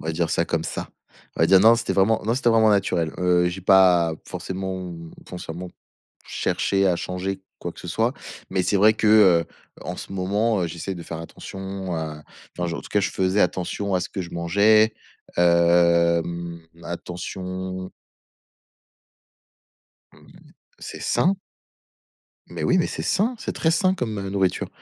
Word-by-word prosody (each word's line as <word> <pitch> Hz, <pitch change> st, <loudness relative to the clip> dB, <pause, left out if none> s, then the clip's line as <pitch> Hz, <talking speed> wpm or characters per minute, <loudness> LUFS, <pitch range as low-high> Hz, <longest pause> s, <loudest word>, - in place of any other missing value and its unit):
On 80 Hz, -, -8 dB
va 80 Hz, -, -1 dB
dire 85 Hz, 0 st, -1 dB
ça -, -, +1 dB
comme -, -, -1 dB
ça. -, -, -5 dB, 0.5 s
On -, -, -3 dB
va -, -, +5 dB
dire 95 Hz, +1 st, +6 dB
non, 110 Hz, +3 st, +7 dB
c'était 115 Hz, 0 st, -2 dB
vraiment 105 Hz, +3 st, +2 dB
non, 115 Hz, +3 st, +1 dB
c'était 125 Hz, -2 st, +1 dB
vraiment 110 Hz, -1 st, +5 dB
naturel, 90 Hz, -5 st, +1 dB
heu, 90 Hz, -1 st, +3 dB
j'ai 90 Hz, +2 st, -6 dB
pas 90 Hz, -3 st, +5 dB
forcément, 95 Hz, -1 st, -5 dB, 0.3 s
consciemment 90 Hz, 0 st, -7 dB, 0.6 s
cherché 100 Hz, 0 st, 0 dB
à 90 Hz, -2 st, +2 dB
changer 95 Hz, +2 st, -4 dB, 0.2 s
quoi 85 Hz, -, -5 dB
que -, -, -13 dB
ce 90 Hz, -, -9 dB
soit. 115 Hz, +8 st, 0 dB, 0.4 s
Mais 95 Hz, -, +1 dB
c'est 100 Hz, -, +1 dB
vrai 110 Hz, +3 st, +5 dB
que, 110 Hz, -, -1 dB
heu, 95 Hz, -6 st, +6 dB, 0.4 s
en -, -, -5 dB
ce -, -, -8 dB
moment, 100 Hz, +2 st, 0 dB
heu, -, -, 0 dB
j'essaie 85 Hz, +4 st, -5 dB
de 85 Hz, -, -8 dB
faire 85 Hz, -1 st, -7 dB
attention 95 Hz, +2 st, -7 dB
à 80 Hz, -2 st, -5 dB, 0.4 s
enfin 90 Hz, -, -1 dB
je 85 Hz, -, -3 dB
en -, -, -6 dB
tout -, -, -12 dB
cas 105 Hz, -, +1 dB
je 100 Hz, -, -1 dB
faisais 95 Hz, +2 st, +1 dB
attention 95 Hz, +2 st, -1 dB
à 90 Hz, -, +2 dB
ce 90 Hz, -, -4 dB
que 95 Hz, -, -4 dB
je 85 Hz, -, -9 dB
mangeais, 105 Hz, +6 st, +3 dB, 0.4 s
hem 85 Hz, 0 st, +3 dB, 0.2 s
attention 95 Hz, +2 st, -6 dB, 2.9 s
C'est -, -, -8 dB
sain! 190 Hz, +3 st, +2 dB, 1.1 s
Mais -, -, -5 dB
oui, -, -, +3 dB
mais -, -, +2 dB
c'est -, -, -5 dB
sain. 225 Hz, +6 st, 0 dB
C'est -, -, -5 dB
très 160 Hz, -, +1 dB
sain 185 Hz, +3 st, +2 dB
comme, 110 Hz, -, -3 dB
heu, 100 Hz, 0 st, -4 dB
nourriture, 95 Hz, -2 st, 0 dB
95 Hz, 170 wpm, -23 LUFS, 85-100 Hz, 2.9 s, non